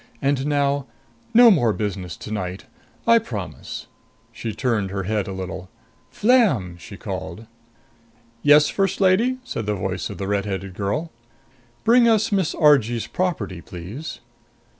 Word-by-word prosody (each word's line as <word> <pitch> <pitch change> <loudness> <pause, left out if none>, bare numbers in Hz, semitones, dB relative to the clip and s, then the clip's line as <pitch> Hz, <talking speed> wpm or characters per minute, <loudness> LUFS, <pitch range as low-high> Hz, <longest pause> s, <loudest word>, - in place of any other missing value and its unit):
And 140 0 0
now 140 -2 +1 0.4
no 235 0 +8
more 120 - +3
business 95 -5 -4
tonight. 95 -3 -5 0.4
I 230 0 +6
promise." 105 - -6 0.5
She 115 0 -5
turned 110 -4 -1
her 95 0 -3
head 105 +1 -1
a - - -4
little. 95 -1 -6 0.4
"Flam!" 200 - +2
she 100 +4 -10
called. 95 +3 -6 1.0
"Yes, 150 +2 +6
First 195 -1 0
Lady?" 205 +7 +3
said 115 - -5
the 105 - 0
voice 95 -1 -3
of - - -7
the 95 - -4
red 100 0 0
headed 95 -1 -4
girl. 105 - -2 0.7
"Bring 235 +1 +5
us 220 -1 +3
Miss 190 -5 +1
Argee's 125 -7 +4
property, 110 - -2
please." 95 - -8
115 Hz, 140 wpm, -22 LUFS, -, 1.0 s, no